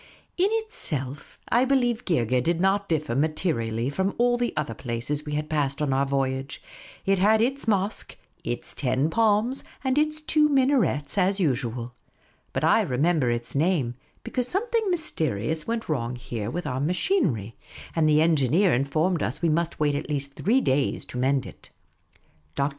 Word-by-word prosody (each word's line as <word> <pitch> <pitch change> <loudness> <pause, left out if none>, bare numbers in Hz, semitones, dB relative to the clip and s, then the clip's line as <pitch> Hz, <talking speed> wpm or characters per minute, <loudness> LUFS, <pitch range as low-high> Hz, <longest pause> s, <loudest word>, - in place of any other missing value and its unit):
In 370 +2 +3
itself, 150 - -3
I 240 +2 +4
believe, 250 -3 +1
Geergeh 125 - +1
did 170 +5 0
not 195 +2 +1
differ 150 -7 0
materi 155 -4 0
ally 115 +3 -1
from 190 +7 -1
all 245 0 +3
the 240 0 -1
other 145 -7 -1
places 125 +6 -4
we 150 - -3
had 150 +1 -2
passed 140 -3 -1
on 145 -3 0
our 135 +1 +1
voyage; 135 0 -2 0.5
it 195 -1 +2
had 215 +3 +4
its 265 +3 0
mosque, 200 -1 -1 0.3
its - - -4
ten 135 +3 0
palms, 225 +5 +2 0.2
and 265 +1 +2
its 305 0 0
two 305 -1 +3
minarets, 255 - +2
as 195 +2 +2
usual. 125 - -1 0.6
But - - -2
I - - +5
remember 145 +1 +1
its 120 0 -2
name, 145 -5 +1 0.3
because 250 -2 -2
something 445 - 0
mys 335 -4 0
terious 155 +2 -2
went 230 0 -2
wrong 125 -5 -2
there 110 -2 -2
with 175 +7 -4
our 130 -2 -2
machinery; 150 - 0 0.4
and 160 -2 +3
the 155 +1 +5
engineer 160 - +3
informed 155 +6 +1
us 125 - -2
we 170 - +3
nmst 165 +2 0
wait 150 -1 +1
at 145 +2 -3
least 140 -1 -3
three 240 - +2
days 135 - 0
to 125 - -6
mend 130 0 +1
it. - - -13 0.9
Dr. 140 +1 +1
155 Hz, 170 wpm, -25 LUFS, 135-220 Hz, 0.9 s, I